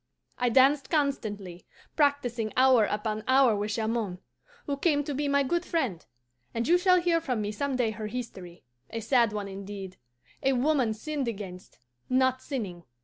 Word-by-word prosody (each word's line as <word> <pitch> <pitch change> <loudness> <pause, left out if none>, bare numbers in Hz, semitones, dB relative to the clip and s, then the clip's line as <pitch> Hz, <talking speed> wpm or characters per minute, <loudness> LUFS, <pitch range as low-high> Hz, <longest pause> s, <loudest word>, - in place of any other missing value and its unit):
"I 245 -1 +2
danced 270 +3 +4
constantly, 210 - -2 0.3
practising 250 -7 +1
hour 255 -4 +6
upon 215 +1 -2
hour 260 -3 +5
with 205 +1 -2
Jamond, 220 -4 -1 0.5
who 285 - -1
came 290 0 +1
to 290 - -4
be 290 +2 -1
my 280 0 +3
good 345 +6 0
friend; 260 - -2 0.5
and 230 0 -1
you 350 +2 +5
shall 365 0 +5
hear 340 -1 +2
from 250 -7 -2
me 205 0 -2
some 275 +5 -2
day 240 -3 +1
her 215 0 -5
history 205 -7 -7 0.3
a 230 - -4
sad 235 0 +3
one 205 -1 -4
indeed; 195 -1 -8 0.4
a 270 0 +2
woman 255 -3 +2
sinned 285 +3 -3
against, 195 -5 -7 0.3
not 260 0 +2
sinning. 200 - -5
245 Hz, 165 wpm, -28 LUFS, 210-280 Hz, 0.5 s, hour